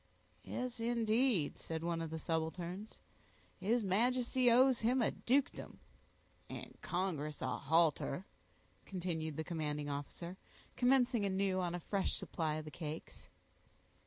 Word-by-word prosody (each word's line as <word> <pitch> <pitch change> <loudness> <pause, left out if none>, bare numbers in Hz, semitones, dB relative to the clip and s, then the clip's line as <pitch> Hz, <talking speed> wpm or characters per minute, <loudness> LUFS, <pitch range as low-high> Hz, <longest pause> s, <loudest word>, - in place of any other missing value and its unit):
"Yes, 250 -1 -4
indeed," 230 - +2
said 160 0 -4
one 170 -1 -1
of 165 - -3
the 160 - -4
subalterns, 170 +5 -3 0.6
"his 220 +5 +2
Majesty 245 +5 +3
owes 255 +1 +6
him 245 +4 +2
a 235 - +3
dukedom." 270 +3 0 0.7
"And - - -7
congress 160 -5 -2
a 130 -1 -2
halter," 160 +2 +2 0.6
continued 165 -5 -3
the 160 - -1
commanding 150 -3 -2
officer 170 +5 -5 0.4
commencing 250 -3 +4
anew 190 -1 +1
on 175 -1 -1
a - - -3
fresh 195 +2 0
supply 155 -3 -2
of 155 0 -4
the 155 - -7
cakes. 155 0 -7
185 Hz, 130 wpm, -36 LUFS, 160-235 Hz, 0.7 s, owes